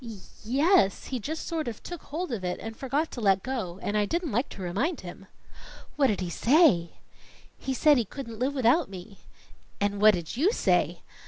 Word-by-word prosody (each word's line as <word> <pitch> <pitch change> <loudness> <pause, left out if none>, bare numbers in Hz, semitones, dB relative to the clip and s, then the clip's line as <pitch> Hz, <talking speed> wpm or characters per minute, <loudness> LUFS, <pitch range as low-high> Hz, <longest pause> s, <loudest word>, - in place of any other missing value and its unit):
"Y 225 -3 -8 0.3
yes. 260 - +3
He 255 - -1
just 310 +8 -5
sort 325 -4 -3
of 230 -3 -6
took 350 -3 -7
hold 325 +1 -4
of 215 -6 -3
it 180 0 -2
and 225 0 -7
forgot 280 +6 -2
to 240 - -6
let 195 -2 +3
go, 215 -9 -4
and 205 - -2
I 210 -1 +2
didn't 340 - -2
like 245 +7 0
to 195 - -9
remind 230 - -1
him." 185 +1 -10 0.7
"What 280 -2 +3
did 205 -5 -1
he 180 - -3
say?" 230 - +4 0.6
"He 265 - -4
said 295 0 +5
he 235 - 0
couldn't 230 -1 -8
live 270 +3 0
without 260 - +3
me." 190 +1 -10 0.6
"And 205 0 -1
what 215 -1 +7
did 170 +2 -5
you 325 - +3
say?" - - +1
235 Hz, 200 wpm, -27 LUFS, 200-290 Hz, 0.7 s, what